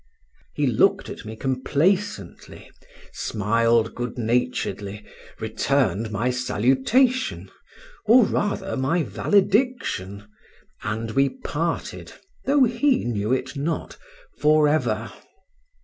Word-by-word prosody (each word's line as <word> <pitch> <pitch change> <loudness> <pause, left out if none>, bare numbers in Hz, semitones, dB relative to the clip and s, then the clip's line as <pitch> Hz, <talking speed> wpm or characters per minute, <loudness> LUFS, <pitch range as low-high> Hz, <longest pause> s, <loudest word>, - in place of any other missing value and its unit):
He - - +1
looked - - +2
at - - -9
me 110 +1 -7
complacently, 140 - -2 0.4
smiled 115 +2 +1
good 120 0 -5
naturedly, 110 -4 -2 0.3
returned 110 -2 0
my 110 +4 -1
salutation 135 - +1 0.6
(or 235 +1 +7
rather 200 -1 -2
my 155 +6 +1
valediction), 195 - 0 0.5
and 110 +1 -3
we 135 +4 +3
parted 165 +5 -4 0.3
(though 280 0 +4
he 250 +3 +2
knew 110 -2 -1
it 130 +1 -1
not) 155 +4 -3 0.4
for 150 0 +4
ever. 155 +1 0
130 Hz, 95 wpm, -23 LUFS, 110-185 Hz, 0.6 s, or